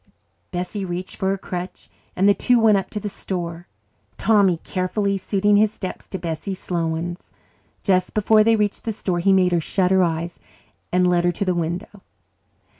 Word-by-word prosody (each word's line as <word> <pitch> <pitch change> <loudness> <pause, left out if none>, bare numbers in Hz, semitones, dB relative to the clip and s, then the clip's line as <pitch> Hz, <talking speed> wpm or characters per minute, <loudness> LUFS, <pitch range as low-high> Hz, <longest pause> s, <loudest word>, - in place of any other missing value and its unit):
Bessie 180 +3 -4
reached 180 0 -5
for 190 -2 -1
her 195 - 0
crutch 180 -1 -6 0.3
and 190 +2 +3
the 205 - +7
two 245 +4 +3
went 220 -2 +5
up 195 - -1
to 210 - -4
the 210 - -4
store, 175 -3 -5 0.5
Tommy 200 -5 +3
carefully 195 +2 -1
suiting 205 +1 +2
his 215 0 +4
steps 185 -3 -7
to 190 - -5
Bessie's 170 +3 -4
slow 170 -3 -2
ones. 170 +2 -4 0.5
Just 185 -2 +1
before 215 +1 +5
they 225 +1 +4
reached 210 -2 -1
the 225 - -1
store 185 -4 -2
he 195 +3 +3
made 185 -1 +4
her 170 -1 +2
shut 185 +3 0
her 190 0 +5
eyes 170 0 -2 0.5
and 180 0 +3
led 175 -1 +3
her 175 - +3
to 200 - -2
the 185 - +1
window. 175 +4 -4
185 Hz, 190 wpm, -22 LUFS, 175-205 Hz, 0.5 s, the